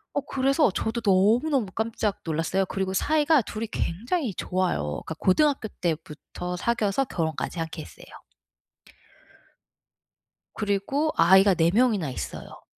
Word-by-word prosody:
어 285 - +1
그래서 275 +1 +2
저도 220 +5 -2
너무너무 225 +7 +3
깜짝 220 -2 -2
놀랐어요. 165 +4 0
그리고 190 -1 -2
사이가 305 - +3
2이 225 +1 -5
굉장히 235 - -2
좋아요. 75 - -2
그러니까 160 - -5
고등학교 265 - +2
때부터 165 +2 -4
사귀어서 230 +4 0
결혼까지 160 - -3
한 165 - -2
케이스예요. 155 - -10 2.4
그리고 215 +10 -1
아이가 190 +3 +6
4 165 0 +3
명이나 215 - +2
있어요. 125 - -7
200 Hz, 310 characters per minute, -25 LUFS, 175-250 Hz, 2.4 s, 아이가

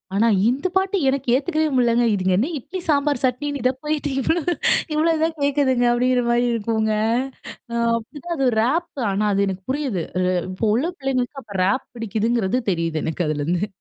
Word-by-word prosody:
ஆனா, 225 +3 +3 0.2
இந்த 275 +9 0
பாட்டு 380 +1 +2
எனக்கு 270 -2 -1
ஏத்துக்கவே 310 +3 0
முடியலங்க. 240 -1 +3
இதுங்க 190 -1 +1
என்ன 260 +10 +1
இட்லி, 370 +9 -7
சாம்பார், 285 -2 +2
சட்னின்னு 280 +3 -1
இத 255 - +3
போயிட்டு 300 -1 -1
இவ்ளோ, 325 +6 +1 0.5
இவ்ளோ 325 +2 +3
தான் 325 0 0
கேட்குதுங்க 270 -3 +2
அப்படிங்கிற 250 +1 +2
மாரி 240 +1 +2
இருக்குங்க 220 -1 0 0.8
அ 235 - -3 0.2
அப்பிடிதான் 305 +9 -6
அது 270 - +1
ஒரு 220 - -1
ரேப். 335 +8 +1 0.2
ஆனா, 205 +2 0
அது 200 0 +2
எனக்கு 190 0 -4
புரியுது. 265 - -2 0.2
அ - - +1 0.3
இப்போ 185 +4 -2
உள்ள 265 +7 +1
பிள்ளைங்களுக்கு 270 0 -2
அப்போ 205 -3 -11
ரேப் 260 +8 +1
பிடிக்குதுங்கிறது 225 +1 0
தெரியுது 165 -2 -1
எனக்கு 160 +1 -2
அதிலேருந்து 165 +6 -1
250 Hz, 170 wpm, -22 LUFS, 215-285 Hz, 0.8 s, ஆனா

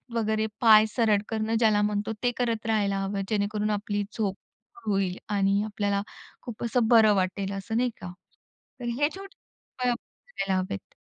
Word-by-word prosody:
वगैरे 220 -1 +1 0.2
पाय 215 -2 +8
सरळ 220 -4 +3
करणं 220 0 -1
ज्याला 215 -3 +4
म्हणतो, 210 +1 -1
ते 245 - +3
करत 230 -3 -1
राहायला 205 -3 +1
हवं, 195 0 -2
जेणेकरून 210 0 0
आपली 205 0 -1
झोप 200 -3 -1 0.5
होईल 195 -3 0
आणि 200 -1 +2
आपल्याला 205 -1 -1 0.4
खूप 240 -2 -7
असं 235 0 +1
बरं 220 -3 +6
वाटेल 190 +1 -1
असं 220 +3 -3
नाही 250 +1 +2
का. 180 -1 -6 0.7
तर - - -6 0.2
हे 290 - +4
छोटे 390 +4 -11 0.5
उपाय - - +3
करायला 215 - -4
हवेत. 185 - -5
210 Hz, 155 wpm, -27 LUFS, 200-225 Hz, 0.7 s, पाय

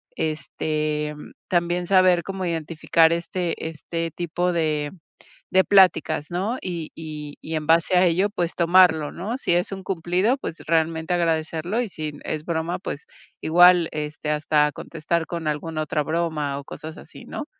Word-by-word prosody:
este, 155 -1 -2
mm, 150 - -11 0.2
también 175 0 0
saber 185 -2 +5
cómo 190 -1 -4
identificar, 165 0 +2
este 170 -1 -3
este 165 +1 -4
tipo 175 +2 -1
de 150 -3 0 0.6
de 190 0 +5
pláticas, 175 -6 +4
¿no? 200 +8 -1
Y 170 -4 -4
y 150 -2 -7
y 160 - -5
en 155 0 -3
base 170 +2 +4
a 180 - +5
ello, 185 +4 +2
pues, 175 -5 -2
tomarlo, 170 -3 +4
¿no? 215 +9 -4
Si 175 - 0
es 175 +3 +1
un 190 -1 -6
cumplido, 185 - +1
pues 165 - -6
realmente 160 +1 +1
agradecerlo. 165 +4 0
Y 235 - -2
si 155 -4 -5
es 155 0 -3
broma, 170 +1 -2
pues 150 -5 -6 0.4
igual, 175 +1 +6
este, 150 0 -3
hasta 150 0 +2
contestar 165 +1 -3
con 170 -2 -4
alguna 155 +1 -2
otra 150 -1 -1
broma, 155 -3 -1
o - - -9
cosas 160 +3 -8
así, - - -12
¿no? 295 - -6
165 Hz, 160 wpm, -23 LUFS, 155-180 Hz, 0.6 s, igual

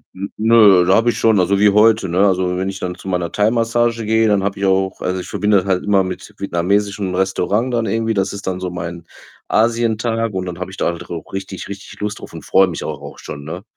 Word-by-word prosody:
n 95 +1 -5
nö, 105 -5 +6
da 95 - +4
habe 115 +1 +3
ich - - -4
schon 110 -2 +3
also, 95 +2 +2
wie 105 -1 +6
heute, 105 -1 +4
ne? 95 +4 +3
Also, 90 -1 +1
wenn 95 +1 -2
ich 95 0 -6
dann 90 0 -4
zu 95 - -14
meiner 90 -2 -2
Thaimassage 115 +1 +1
gehe, 110 +1 +2
dann 100 -2 +2
habe 100 0 -2
ich 100 - -2
auch 95 0 +1
also, 90 0 -2
ich - - -8
verbinde 105 -1 +2
das 95 - -2
halt 95 -1 0
immer 100 -2 +3
mit 95 +2 -7
vietnamesischem 100 +1 -1
Restaurant 95 +6 0
dann 115 -2 0
irgendwie. 115 +2 -1
Das 95 -1 0
ist 100 -1 -6
dann 90 - -2
so 90 -1 -4
mein 85 -1 -6 0.4
Asientag 115 0 0
und 95 0 -3
dann 90 -1 -6
habe 90 +1 -6
ich 95 - -10
da - - -1
halt 85 -1 -3
auch 85 -2 -7
richtig, 95 0 -6
richtig 100 0 -10
Lust 105 0 -3
drauf - - -11
und - - -9
freue 95 - +4
mich 90 - -5
auch - - -5
auch - - -10
schon, 70 -1 -8
ne? 85 +5 -7
100 Hz, 250 wpm, -18 LUFS, 90-110 Hz, 0.4 s, nö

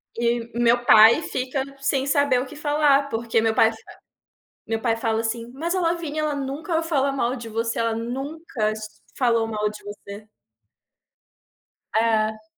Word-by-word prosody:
E 235 0 -1
meu 240 0 +3
pai 220 +8 +7
fica 260 0 -2 0.2
sem 275 -1 0
saber 280 -2 +2
o 255 - -3
que 280 - -11
falar, 290 -2 +2
porque 225 -1 0
meu 225 0 +1
pai 225 0 +5 0.9
meu 225 0 -2
pai 230 -2 0
fala 225 -1 -1
assim, 230 +1 -3
mas 335 +7 -3
a 370 - 0
Lavina 330 -3 -2
ela 305 -1 -1
nunca 305 +5 -2
fala 280 -4 +1
mal 255 -2 -1
de 235 -3 -8
você, 230 +1 -2
ela 230 -1 0
nunca 255 -1 -3 0.5
falou 230 -3 +2
mal 210 -1 -1
de 210 - -10
você. 205 +1 -10 1.7
É. 220 -1 +1
240 Hz, 155 wpm, -23 LUFS, 225-280 Hz, 1.7 s, pai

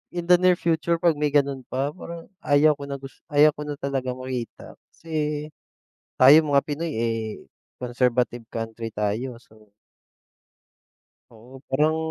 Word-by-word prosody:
in 175 -1 -3
the 180 0 +6
near 180 0 +4
future 170 0 0
pag 170 -1 +3
may 150 0 +2
gano'n 140 -2 +2
pa, 135 +3 -2
parang 170 0 -9 0.2
ayaw 150 +1 +4
ko 140 - -9
na 140 - -4
gus 135 -1 -12
ayaw 150 +1 +6
ko 150 - -9
na 145 - -3
talagang 135 -2 -3
makita. 130 -2 -6 0.2
Kasi, 150 -2 -3 0.7
tayong 145 +3 +7
mga 140 0 +5
Pinoy, 155 +2 -3
eh, 115 0 0 0.6
conservative 125 -1 0
country 115 0 -5
tayo 110 +4 -2
so 110 -3 -22 1.6
oo 120 +4 -15
parang, 155 +4 +2
140 Hz, 145 wpm, -24 LUFS, 125-155 Hz, 1.6 s, tayong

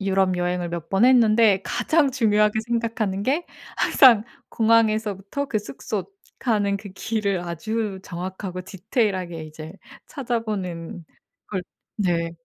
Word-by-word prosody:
유럽 190 -1 +2
여행을 175 -1 -1
몇 170 -2 -5
번 195 +4 +3
했는데 225 -5 +5
가장 310 -4 +1
중요하게 215 -3 +2
생각하는 225 -4 -1
게 295 +9 0 0.3
항상 235 -6 +6 0.2
공항에서부터 220 +1 +1
그 215 - 0
숙소 210 - -5 0.3
가는 205 -5 +1
그 205 - -9
길을 200 -1 -1
아주 195 +4 -3
정확하고 185 +1 -6
디테일 205 +3 -1
하게 170 -3 -5
이제 155 +1 -9 0.3
찾아보는 205 - -4 0.4
걸 190 -3 -3 0.3
네. 170 -4 0
205 Hz, 270 characters per minute, -23 LUFS, 180-225 Hz, 0.4 s, 항상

